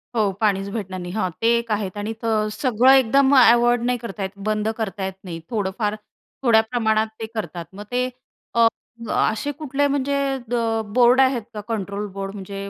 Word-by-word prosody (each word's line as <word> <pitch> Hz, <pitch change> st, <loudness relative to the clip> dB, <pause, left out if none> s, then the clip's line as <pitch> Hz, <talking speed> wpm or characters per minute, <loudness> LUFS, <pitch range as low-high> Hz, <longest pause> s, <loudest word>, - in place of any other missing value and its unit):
हो, 210 Hz, -4 st, +2 dB
पाणीच 200 Hz, -2 st, +1 dB
भेटणार 190 Hz, -4 st, -4 dB
नाही 175 Hz, 0 st, -6 dB
हां, 215 Hz, -4 st, 0 dB
ते 225 Hz, -, +2 dB
एक 230 Hz, -1 st, -4 dB
आहेत 205 Hz, -2 st, -2 dB
आणि 210 Hz, +2 st, -3 dB
तर 220 Hz, -2 st, +1 dB
सगळं 250 Hz, +2 st, +3 dB
एकदम 270 Hz, +2 st, +4 dB
अव्हॉइड 240 Hz, -1 st, +5 dB
नाही 250 Hz, 0 st, +1 dB
करता 220 Hz, -4 st, -6 dB
येत, 190 Hz, -, -2 dB, 0.2 s
बंद 215 Hz, 0 st, 0 dB
करता 200 Hz, -3 st, -3 dB
येत 190 Hz, -, -4 dB
नाही, 170 Hz, -3 st, -6 dB
थोडंफार 210 Hz, 0 st, -1 dB, 0.5 s
थोड्या 230 Hz, -3 st, +5 dB
प्रमाणात 220 Hz, -3 st, +1 dB
ते 225 Hz, -, -3 dB
करतात. 180 Hz, -5 st, -4 dB
मग 205 Hz, +2 st, -8 dB
ते 250 Hz, +1 st, +1 dB, 0.5 s
अ, 230 Hz, -1 st, +6 dB, 0.5 s
असे 220 Hz, +7 st, 0 dB
कुठले 285 Hz, -1 st, -1 dB
म्हणजे 280 Hz, 0 st, 0 dB, 0.2 s
अ, 230 Hz, -2 st, -1 dB
बोर्ड 250 Hz, +1 st, +6 dB
आहेत 260 Hz, -2 st, +2 dB
का 210 Hz, -, -5 dB
कंट्रोल 205 Hz, -2 st, -3 dB
बोर्ड 195 Hz, +1 st, -5 dB
म्हणजे 200 Hz, 0 st, -7 dB
220 Hz, 180 wpm, -22 LUFS, 200-245 Hz, 0.5 s, अ